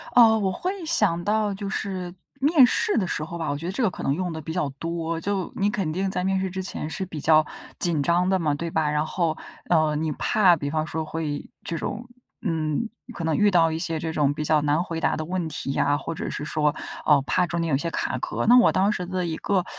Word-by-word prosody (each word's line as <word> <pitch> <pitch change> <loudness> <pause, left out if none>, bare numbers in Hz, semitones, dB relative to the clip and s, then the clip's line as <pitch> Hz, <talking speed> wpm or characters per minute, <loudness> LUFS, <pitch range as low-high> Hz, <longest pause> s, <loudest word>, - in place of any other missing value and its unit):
呃， 225 -2 +7
我 195 -2 0
会 365 - -4
想 190 - +2
到 210 +1 +1
就 200 0 -5
是 185 -3 -4 0.3
面 285 -1 +6
试 415 - +1
的 190 - +1
时 155 - -2
候 170 +2 -6
吧， 165 - -3
我 145 - -1
觉 160 - -7
得 180 - -2
这 255 - -3
个 220 - +4
可 - - -8
能 135 - +1
用 180 +1 -2
得 160 - -5
比 160 +1 -5
较 180 -6 0
多。 165 0 -2
就 195 0 -2
你 200 +1 +1
肯 195 -6 -1
定 190 +3 -1
在 180 -1 -2
面 190 0 +1
试 190 0 -1
之 190 +1 -4
前 155 -4 -5
是 190 - -3
比 165 -4 -7
较 155 +1 +4 0.3
紧 170 -5 +2
张 175 +3 +2
的 190 - +3
嘛， 155 -4 +1
对 165 +3 -3
吧？ 155 -2 +1
然 150 +1 +1
后， 165 -1 -1 0.3
呃， 155 -3 +3
你 155 +1 -1
怕 190 -5 +4
比 145 -3 -4
方 155 +1 -1
说 160 -1 -3
会 155 -2 -4
这 165 - -3
种 230 +8 -4 0.3
嗯， 160 +2 -1 0.2
可 170 - -6
能 160 -1 +1
遇 210 0 +4
到 165 -3 +4
一 160 - -2
些 165 -2 -2
这 160 0 -3
种 145 -2 +2
比 150 - -4
较 150 0 +3
难 150 +3 +1
回 165 -2 -4
答 - - +2
的 155 - -4
问 180 0 -2
题 135 - -4
呀， 145 +1 +2
或 165 - -5
者 - - -4
是 150 - -4
说， 150 -1 +1 0.3
呃， 145 -2 +5
怕 180 +5 +1
中 170 +1 -2
间 165 - -1
有 140 - +3
一 - - 0
些 170 - -2
卡 - - -2
壳。 - - -2
那 245 +2 +8
我 240 - +5
当 195 +2 +2
时 180 -4 -3
的 185 0 -2
一 165 -2 -2
个 190 -3 0
170 Hz, 280 characters per minute, -25 LUFS, 155-190 Hz, 0.3 s, 那